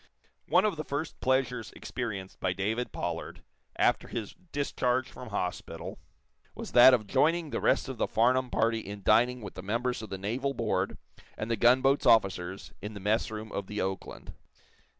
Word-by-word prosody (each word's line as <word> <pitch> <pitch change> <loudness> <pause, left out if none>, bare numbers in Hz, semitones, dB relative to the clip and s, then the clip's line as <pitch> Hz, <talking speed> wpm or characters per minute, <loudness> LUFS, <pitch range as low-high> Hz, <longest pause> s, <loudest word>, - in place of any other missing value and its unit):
One 185 +3 +4
of 205 -6 0
the 155 - -3
first 150 +2 -4
pleasures 125 -3 0
experienced 100 -7 -5
by 90 - 0
David 110 +6 -2
Pollard, - - -5 0.3
after - - +2
his 110 -3 -5 0.2
discharge 130 -3 0
from 125 - -10
hospital, 90 -4 -4 0.6
was - - -7
that 125 +1 +9
of 110 -4 -4
joining 155 - +2
the - - -2
rest - - +2
of 130 -4 -6
the - - +1
Farnum 125 +3 +2
party 115 -1 +1
in 100 -1 -8
dining 120 +3 +4
with 100 - -7
the 95 - -7
members 115 +5 -1
of 110 - -8
the 95 - -4
naval 125 +8 -2
board 100 -4 -1 0.4
and 110 +2 -3
the - - +3
gunboat's 130 +5 +4
officers 95 -3 +2
in 105 +2 -6
the - - -6
messroom 110 +1 -1
of 100 -1 -4
the 105 - -4
"Oakland." 95 0 -4
115 Hz, 170 wpm, -29 LUFS, 100-130 Hz, 0.6 s, that